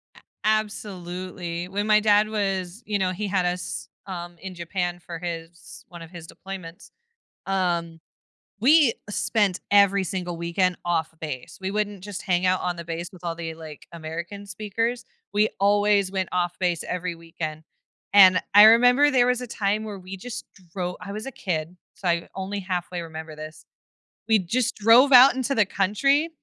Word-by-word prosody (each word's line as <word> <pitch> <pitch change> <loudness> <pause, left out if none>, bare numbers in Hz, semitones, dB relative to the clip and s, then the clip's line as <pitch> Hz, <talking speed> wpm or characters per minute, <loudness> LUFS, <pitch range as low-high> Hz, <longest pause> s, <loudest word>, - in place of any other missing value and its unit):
A - - -16 0.2
absolutely, 185 -5 -3
when 205 +3 -2
my 215 0 +6
dad 210 0 +4
was 195 -1 -2
you 210 -1 -1
know, 185 -1 +1
he 205 +3 -3
had 190 -2 +1
us, 180 0 -3 0.2
um, 175 -2 -6
in 190 -1 -7
Japan 175 0 -3
for 170 -1 -8
his 165 -3 -8
one 175 -1 -11
of 165 - -10
his 170 -3 -10
deployments, 180 -3 -9 0.6
um, 170 -4 -1 0.6
we 280 0 +5 0.2
spent 205 -3 +1
every 200 -1 +5
single 180 -1 -4
weekend 170 +2 0
off-base. 160 -5 -3
We 190 0 -3
wouldn't 205 -2 -2
just 205 -2 -6
hang 180 -2 +1
out 185 0 +2
on 180 -1 -2
the 170 - -7
base 165 +1 -5
with 180 -2 -15
all 170 -1 -2
the, 165 -1 -6
like, 160 -2 -11
American 170 +5 -7
speakers; 215 +4 -3 0.3
we 210 +1 +3
always 205 -1 +3
went 190 -2 -1
off-base 175 -1 -1
every 180 -1 -3
weekend. 160 -2 -6 0.5
And 185 -2 +8
I 205 +1 +10
remember 245 +6 +6
there 250 -3 +4
was 250 0 +1
a 250 - -5
time 210 0 -1
where 210 -2 -6
we 185 +1 -8
just 235 +5 -7 0.3
dro 180 -1 -3
I 205 -1 -8
was 215 +3 -6
a 270 - -6
kid, 170 -4 -3 0.2
so 210 -3 -8
I 170 0 0
only 195 +1 -4
halfway 180 -1 -3
remember 160 -1 -8
this, 155 +1 -10 0.6
we 220 -1 +5
just 220 +7 -1
drove 230 +6 +6
out 255 +2 +9
into 265 +1 -1
the 210 - +4
country, 275 - +1
185 Hz, 170 wpm, -24 LUFS, 170-210 Hz, 0.6 s, I